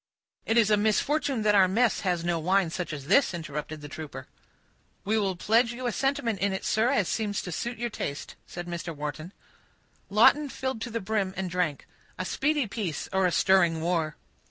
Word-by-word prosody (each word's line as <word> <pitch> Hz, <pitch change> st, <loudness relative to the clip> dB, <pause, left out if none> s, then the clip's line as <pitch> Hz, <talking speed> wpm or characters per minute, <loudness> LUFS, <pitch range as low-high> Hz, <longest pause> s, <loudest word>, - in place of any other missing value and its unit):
"It 225 Hz, -, +2 dB
is 215 Hz, -2 st, +4 dB
a 210 Hz, -, +5 dB
misfortune 235 Hz, +4 st, +1 dB
that 210 Hz, -1 st, +4 dB
our 195 Hz, -2 st, +6 dB
mess 225 Hz, +4 st, +2 dB
has 180 Hz, -3 st, -1 dB
no 170 Hz, -1 st, 0 dB
such -, -, -7 dB
wine 185 Hz, -1 st, +2 dB, 0.2 s
as 145 Hz, -3 st, -6 dB
this," 230 Hz, -, +3 dB
interrupted 150 Hz, -1 st, -6 dB
the 145 Hz, -, -7 dB
trooper. 145 Hz, -3 st, -8 dB, 0.8 s
"We 220 Hz, +2 st, +2 dB
will 195 Hz, -3 st, 0 dB
pledge 230 Hz, +6 st, +2 dB
you 250 Hz, +1 st, -6 dB
a 240 Hz, -, +1 dB
sentiment 235 Hz, -5 st, -1 dB
in 200 Hz, +1 st, +1 dB
it, 190 Hz, -, -4 dB
sir, 220 Hz, +3 st, +2 dB
as 210 Hz, -9 st, +2 dB
it -, -, -2 dB
seems 210 Hz, -3 st, -1 dB
to 180 Hz, -, -6 dB
suit 235 Hz, +8 st, -3 dB
your 240 Hz, +1 st, -3 dB
taste," 140 Hz, -7 st, -5 dB
said 175 Hz, 0 st, -7 dB
Mr. 170 Hz, -1 st, -5 dB
Wharton. 150 Hz, +4 st, -5 dB, 0.8 s
Lawton 275 Hz, +8 st, +5 dB
filled 260 Hz, -4 st, -4 dB
to 240 Hz, -, -3 dB
the 230 Hz, 0 st, -3 dB
brim, 195 Hz, -1 st, -1 dB
and 190 Hz, -2 st, -3 dB
drank, 175 Hz, -5 st, -1 dB, 0.3 s
"A 185 Hz, -, -3 dB
speedy 295 Hz, +5 st, +1 dB
peace, 195 Hz, -6 st, -4 dB
or 190 Hz, -1 st, +3 dB
a -, -, 0 dB
stirring 175 Hz, -3 st, +3 dB
war." 160 Hz, -2 st, -1 dB
190 Hz, 205 wpm, -27 LUFS, 170-230 Hz, 0.8 s, our